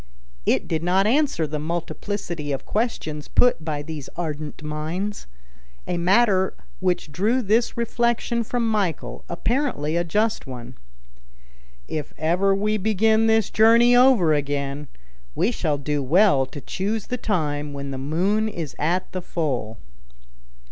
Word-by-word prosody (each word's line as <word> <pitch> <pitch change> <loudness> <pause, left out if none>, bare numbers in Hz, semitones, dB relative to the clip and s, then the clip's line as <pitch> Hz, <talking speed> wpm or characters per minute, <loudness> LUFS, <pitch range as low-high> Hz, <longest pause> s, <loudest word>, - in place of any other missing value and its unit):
It - - +2
did 160 -1 -1
not 185 +3 +2
answer 265 - +2
the 150 0 -4
multiplicity 170 0 -4
of 135 -1 -3
questions 160 -10 -2
put 245 -10 +3
by 150 -2 -3
these 150 -3 -7
ardent 155 -2 -5
minds; 160 +7 -4 0.6
a 175 - -1
matter 190 +1 +3 0.2
which 180 -5 -1
drew 220 - +1
this 225 +4 +1
reflection 235 0 0
from 235 +1 -1
Michel, 195 -8 -2
apparently 170 - -1
a 170 - +2
just 210 +2 0
one: 125 -1 -8 1.1
"If 150 -2 -4
ever 180 +5 +2
we 210 +2 0
begin 220 +2 +2
this 220 -2 +2
journey 230 +3 +6
over 245 -11 +5
again, 140 0 -2 0.5
we 225 - +2
shall 155 -10 -1
do 145 +1 -2
well 145 -1 +4
to 145 +1 -9
choose 205 +7 -3
the 250 - -3
time 150 -9 -1
when 140 -1 -5
the 135 - -4
moon 190 +10 +1
is 165 -8 -6
at 175 +5 0
the 185 - -4
full." 130 -11 -3
175 Hz, 140 wpm, -23 LUFS, 150-220 Hz, 1.1 s, journey